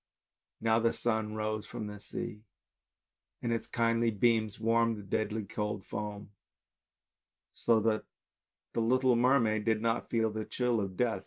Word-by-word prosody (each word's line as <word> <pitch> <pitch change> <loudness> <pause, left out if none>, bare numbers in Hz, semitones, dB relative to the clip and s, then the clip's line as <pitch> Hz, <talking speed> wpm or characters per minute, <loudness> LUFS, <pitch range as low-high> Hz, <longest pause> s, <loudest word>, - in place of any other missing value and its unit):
Now 110 0 +3
the 115 0 +2
sun 110 -2 -1
rose 110 -1 -2
from 110 - -5
the 105 0 -7
sea 105 +1 -6 1.0
and 120 - 0
with 115 - +2
its - - -13
kindly 115 0 +2
beams 110 -1 +1
warmed 115 0 +2
the 105 - -8
deadly 110 +2 -1
cold 105 -1 -3
foam, 105 -1 -5 1.2
so 115 -2 +3
that 110 0 +1 0.7
the - - 0
little 125 +2 +3
mermaid 120 -3 +3
did 110 -1 +2
not 115 +1 0
feel 115 -2 +1
the 110 0 -3
chill 125 -2 0
of 95 -2 -4
death. 115 -5 +1
110 Hz, 155 wpm, -31 LUFS, 105-115 Hz, 1.2 s, Now